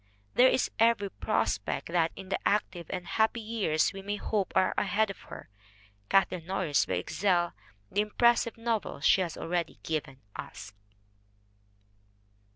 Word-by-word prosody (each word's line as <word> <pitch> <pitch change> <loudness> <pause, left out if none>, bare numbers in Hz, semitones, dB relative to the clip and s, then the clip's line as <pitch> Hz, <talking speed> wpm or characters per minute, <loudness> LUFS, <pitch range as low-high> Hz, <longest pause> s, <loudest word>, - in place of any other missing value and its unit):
There 250 - +6
is 255 - +1
every 225 -3 +3
prospect - - -1
that 170 -1 +2
in 190 -1 -9
the - - 0
active 190 -4 0
and 180 -2 -4
happy 220 +4 +1
years 210 -7 0
we 195 - -7
may 205 +1 -3
hope 205 -2 -1
are 185 - +3
ahead 215 -1 +1
of - - -11
her, - - -9 0.6
Kathleen 185 -3 +2
Norris 180 -6 +1
will 95 - 0
excel 175 - +1 0.4
the 205 - +2
impressive 230 +2 +2
novels 230 -9 -2
she 190 - +6
has 170 -3 -3
already 175 0 -2
given 140 -4 -3
us. 105 -3 -8
195 Hz, 145 wpm, -29 LUFS, 170-215 Hz, 0.6 s, There